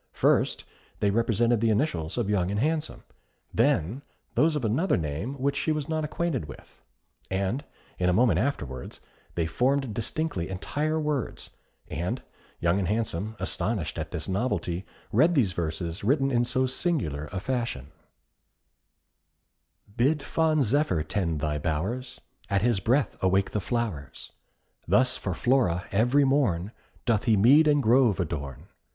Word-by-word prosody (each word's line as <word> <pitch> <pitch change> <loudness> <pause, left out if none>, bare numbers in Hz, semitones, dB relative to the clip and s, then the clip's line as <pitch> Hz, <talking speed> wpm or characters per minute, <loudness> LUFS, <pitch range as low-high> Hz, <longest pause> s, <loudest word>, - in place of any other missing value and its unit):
First, - - +2 0.4
they 100 - +2
represented 115 +1 +2
the 115 - +3
initials 105 - 0
of 120 -4 0
Young 95 -3 +1
and 100 +1 -1
Handsome; 155 +4 -1 0.5
then 100 - +1 0.3
those 155 +1 +3
of 140 -5 -1
another 140 - +2
name, 80 - -3
which 140 +1 0
she 160 - 0
was 150 -2 -2
not 160 -1 -1
acquainted 150 - -2
with; 70 - -13 0.5
and 100 +8 -1 0.4
a 90 0 +3
moment 100 -3 +3
afterwards, 70 - -3 0.4
they 85 - +1
formed 130 - +1
distinctly 115 - -2
entire 150 +12 -1
words, 150 -4 -3 0.4
and 85 +4 -3 0.4
Young 85 +3 +2
and 95 - -1
Handsome, 110 0 -2
astonished 95 -3 -2
at 80 0 -4
this 85 -2 -5
novelty, 95 -4 -1 0.2
read 170 +2 +4
these 110 -10 +2
verses, 85 +2 -3
written 135 +4 +2
in 120 -1 +2
so 130 +2 +1
singular 125 - -1
a 95 - -3
fashion: 115 - -3 2.0
Bid 140 +4 +2
fond 155 0 +2
Zephyr 125 - +1
tend 85 -3 -1
thy 75 -1 -1
bowers, 110 - -3 0.3
At 100 -1 +1
his 120 -4 +2
breath 120 +5 +1
awake 95 +1 +2
the 105 - -1
flowers. 105 - -4 0.6
Thus 125 +8 +3
for 95 -4 -3
Flora, 115 -9 +2
every 125 +8 +3
morn, 115 -10 +1 0.3
Doth 115 -3 +1
he 110 -3 +4
mead 140 +10 +6
and 145 -2 +3
grove 120 -3 +4
adorn. 70 -6 -4
110 Hz, 145 wpm, -27 LUFS, 90-135 Hz, 2.0 s, mead